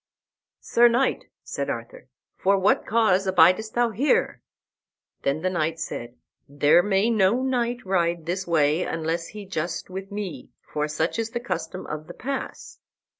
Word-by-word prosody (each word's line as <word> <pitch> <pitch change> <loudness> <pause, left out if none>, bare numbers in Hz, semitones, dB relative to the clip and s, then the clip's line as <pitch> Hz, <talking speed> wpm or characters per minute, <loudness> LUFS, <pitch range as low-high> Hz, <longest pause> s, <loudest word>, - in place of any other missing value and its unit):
"Sir 240 +1 +5
knight," 240 +3 +1 0.2
said - - -4
Arthur, - - -6 0.3
"for 195 +1 +2
what 195 +2 +2
cause 200 -4 +3
abidest 185 +5 +4
thou 240 -1 +2
here?" 285 - +1 0.8
Then 140 +3 0
the 185 - +1
knight 165 -2 -1
said, 120 -6 -5 0.3
"There 145 +4 +4
may 205 +3 +2
no 220 +3 +3
knight 245 -2 -1
ride 170 -3 0
this 180 +2 -3
way 155 -1 +2
unless 165 0 -2
he 205 +3 -9
just 170 -1 -4
with 195 +1 -7
me, 190 -10 -6 0.2
for 150 0 0
such 160 +7 -1
is 225 0 -1
the 240 +1 -3
custom 235 -5 -4
of 155 0 -6
the - - -10
pass." 275 +1 -6
190 Hz, 155 wpm, -25 LUFS, 165-225 Hz, 0.8 s, Sir